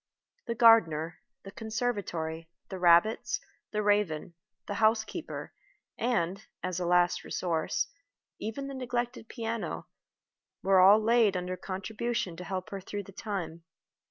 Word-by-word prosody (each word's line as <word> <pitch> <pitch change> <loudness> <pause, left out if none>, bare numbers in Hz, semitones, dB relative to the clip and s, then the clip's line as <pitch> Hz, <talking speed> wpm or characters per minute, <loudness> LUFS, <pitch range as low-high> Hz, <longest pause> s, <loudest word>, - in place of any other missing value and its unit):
The 235 - -1
gardener, 175 -9 +5 0.2
the 195 - -9
conservatory, 205 -8 -3 0.2
the 190 - -5
rabbits, 175 +5 +4 0.3
the 210 -1 -1
raven, 200 -6 +1 0.3
the 205 - -4
housekeeper, 220 0 0 0.4
and, 195 -5 0 0.2
as 185 -1 -2
a 175 - -1
last 175 0 +3
resource, 165 -3 -1 0.5
even 225 +6 -4
the 275 - -6
neglected 245 -2 -3
piano, 230 -2 -4 0.8
were 190 -1 +5
all 195 +3 +8
laid 220 -3 +4
under 180 0 -3
contribution 195 +1 -3
to 180 - -6
help 185 0 -4
her 195 -1 -5
through 205 +2 -5
the 195 - -12
time. 185 -5 -5
195 Hz, 130 wpm, -30 LUFS, 175-225 Hz, 0.8 s, all